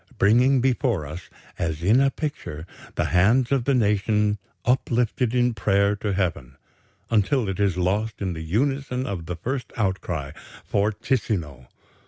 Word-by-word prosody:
bringing 125 +6 +4
before 125 - +1
us, 80 +4 -8 0.3
as 80 -1 -2
in 110 +8 +5
a 135 - +4
picture, 130 - -5 0.3
the - - 0
hands 115 +8 +4
of 135 -4 +1
the 140 - +2
nation 105 -1 +2 0.3
uplifted 125 -1 +1
in 125 -1 +3
prayer 100 0 +2
to 105 0 -3
Heaven, 90 -10 -2 0.5
until 110 +2 +2
it 95 0 -3
is 100 -3 +1
lost 105 +5 0
in 95 -3 -2
the 80 - -6
unison 130 - -1
of 90 -8 -5
the 90 - -3
first 125 - -4
outcry, 90 -8 -2 0.3
fortissimo.... 100 - -1
105 Hz, 145 wpm, -24 LUFS, 90-125 Hz, 0.5 s, in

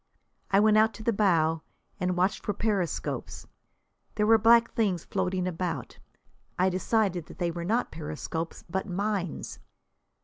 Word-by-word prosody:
I 195 - +4
went 215 0 +5
out 220 +1 +4
to 220 - -9
the 230 - +1
bow 165 -6 +2 0.4
and 180 -1 0
watched 185 +2 +1
for 205 - -2
periscopes. 200 -6 -2 0.7
There 210 - +2
were 225 +1 +6
black 230 +2 +5
things 200 -8 0
floating 185 0 -1
about. 165 -7 -4 0.6
I 185 +1 +3
decided 185 -2 0
that - - -12
they 175 -2 0
were 170 0 -5
not 230 +6 0
periscopes, 160 +1 -5
but 190 +4 -3
mines. 195 -2 -3
185 Hz, 145 wpm, -28 LUFS, 170-215 Hz, 0.7 s, were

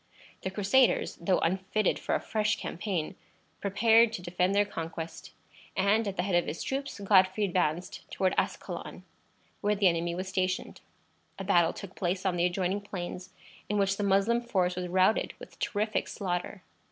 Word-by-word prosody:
The 190 - -2
Crusaders, 210 +7 +2
though 185 +2 +2
unfitted 190 +3 0
for - - -1
a - - +1
fresh 215 0 0
campaign, 185 -4 -3 0.4
prepared 225 +3 +4
to 180 - -5
defend 180 +2 0
their 205 0 +4
conquest, 165 -3 -6 0.5
and, 205 +3 +3
at 195 - -4
the 180 - +1
head 195 0 -2
of 175 0 +3
his 165 - -4
troops, 275 -3 -3
Godfrey 190 0 +4
advanced 180 -1 -1
toward 185 -1 0
Ascalon, - - -3 0.6
where 210 0 +2
the 200 -1 +4
enemy 170 0 0
was 185 +2 -4
stationed. 185 -1 -2 0.6
A 195 - -5
battle 175 -3 +4
took 195 -1 -10
place 185 +1 -2
on 185 -2 +1
the 175 0 +2
adjoining 185 +2 -1
plains, 185 -2 -6 0.4
in 210 - 0
which 195 -1 +2
the 205 - -1
Moslem 200 +4 +3
force 185 -7 0
was 180 0 -3
routed 185 +4 +2
with - - -13
terrific 215 0 -1
slaughter. 180 0 -4
190 Hz, 165 wpm, -29 LUFS, 180-205 Hz, 0.6 s, prepared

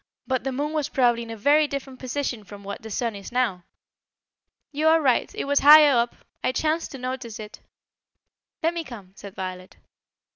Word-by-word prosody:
"But 260 -1 -1
the 270 - -2
moon 290 +4 -3
was 305 -3 -1
probably 240 -3 +2
in 230 - -8
a 225 - -6
very 295 +7 +4
different 275 -2 -6
position 255 -3 -3
from 200 +1 -12
what 200 +4 -7
the 220 - -9
sun 230 +1 -2
is 200 +2 -9
now." 225 -8 -1 1.1
"You 300 +2 0
are 325 +1 +6
right; 265 -6 +1
it - - -3
was 285 0 +2
higher 295 -1 +8
up; 235 0 +1 0.3
I - - +2
chanced 315 +4 0
to - - -6
notice 255 -3 -5
it." 210 0 -9 1.0
"Let 330 +2 +2
me 340 -1 -3
come," 215 -10 -11
said 200 -1 -11
Violet. 185 -1 -7
255 Hz, 190 wpm, -24 LUFS, 215-285 Hz, 1.1 s, higher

